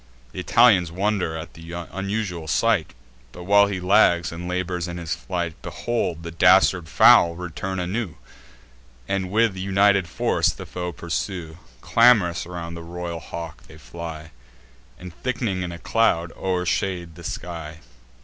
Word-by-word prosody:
Th' - - -12
Italians 100 -8 +4
wonder 95 -3 -1
at 80 +1 -8
th' - - -15 0.3
unusual 95 -3 -3
sight; 105 - +1 0.4
But, 90 - -10
while 100 +2 +5
he 100 -2 -3
lags, 90 -3 +3
and 85 +1 -6
labours 90 -1 -2
in 85 0 -6
his 85 -2 -3
flight, 85 -3 -3
Behold, 90 -9 -3
the 85 - -6
dastard 90 -1 +4
fowl 85 -1 +6
return 90 +2 -5
anew, 90 0 -3 0.9
And 95 -1 -1
with 110 0 +2
united 100 0 +2
force - - +1
the - - -9
foe 90 -1 -5
pursue: 85 -1 -5 0.2
Clam'rous 105 -9 +4
around 85 -1 -6
the 85 - -7
royal 85 0 -6
hawk 80 -1 -8
they 75 - -14
fly, 80 +2 -8 0.7
And, 90 -2 -10
thick'ning 115 -7 -2
in 90 -1 -4
a 85 - -7
cloud, 85 -3 +1
o'ershade 90 -1 -2
the 85 +1 -13
sky. 80 -2 -6
90 Hz, 145 wpm, -23 LUFS, 85-95 Hz, 0.9 s, fowl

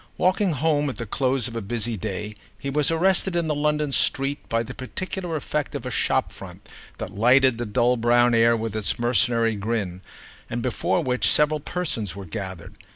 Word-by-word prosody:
Walking 185 0 +2
home 150 0 +1
at 130 - -5
the 115 - -5
close 130 +2 0
of 115 - -8
a 115 - -2
busy 115 +2 -2
day 105 +1 -4 0.2
he 140 - -4
was 150 0 +1
arrested 185 +2 +2
in 170 -2 +1
the 155 - +1
London 150 0 0
street 135 +2 +1
by 115 0 +1
the 120 +2 -8
particular 175 +6 -5
effect 150 0 -3
of 135 -3 -5
a 125 - -3
shop - - 0
front - - -11 0.3
that - - -6
lighted 125 +3 +4
the 120 - -3
dull 120 +3 +2
brown 120 +1 +4
air 115 0 +4
with 110 -1 -4
its 110 -2 0
mercenary 115 -1 +2
grin 100 -4 -3 0.5
and - - -3
before - - 0
which 125 0 +1
several 150 0 +3
persons 130 - -3
were 100 -1 -7
gathered. 95 +1 -7
125 Hz, 190 wpm, -24 LUFS, 115-150 Hz, 0.5 s, lighted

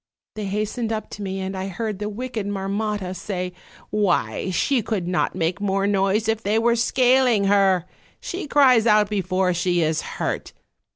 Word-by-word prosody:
They 215 -1 -5
hastened 215 +3 -2
up 220 -1 -4
to 205 - -8
me, 195 -1 -3
and 190 0 -4
I 190 0 -3
heard 210 +1 -4
the 210 0 -3
wicked 225 -1 -4
Marmotta 200 -1 -2
say: 180 -1 -4 0.4
'Why, 200 -2 0
she 250 +7 +1
could 195 -5 -2
not 180 0 0
make 175 +2 -1
more 195 -1 0
noise 200 +2 +1
if 225 0 0
they 210 0 +1
were 235 +1 +3
scaling 245 -2 +3
her; 195 -3 +3 0.3
she 355 -3 -5
cries 255 -6 +5
out 210 -1 +4
before 185 -2 +1
she 175 0 +1
is 155 0 0
hurt. - - -4
205 Hz, 170 wpm, -23 LUFS, 190-220 Hz, 0.4 s, cries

